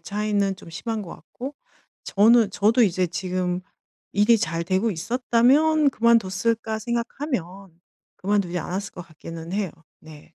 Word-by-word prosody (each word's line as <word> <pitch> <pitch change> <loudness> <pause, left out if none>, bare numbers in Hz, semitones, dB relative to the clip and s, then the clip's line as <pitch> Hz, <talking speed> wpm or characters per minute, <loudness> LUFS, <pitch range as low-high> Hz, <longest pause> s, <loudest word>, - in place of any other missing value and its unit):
차이는 205 -2 -1
좀 170 - -14
심한 225 +6 -4
것 175 - -9
같고 270 +4 -9 0.5
저는 220 +1 +4
저도 220 +5 +3
이제 185 -3 +2
지금 180 0 -2 0.5
일이 210 +3 +4
잘 165 -2 -2
되고 190 +5 +1
있었다면 255 - +3
그만뒀을까 225 -1 +1
생각하면 230 - -4 0.5
그만두지 190 -3 0
않았을 190 +5 -4
것 180 0 -9
같기는 165 +1 -9
해요. 200 -4 -1 0.3
네. 155 +1 -15
200 Hz, 285 characters per minute, -24 LUFS, 180-230 Hz, 0.5 s, 저는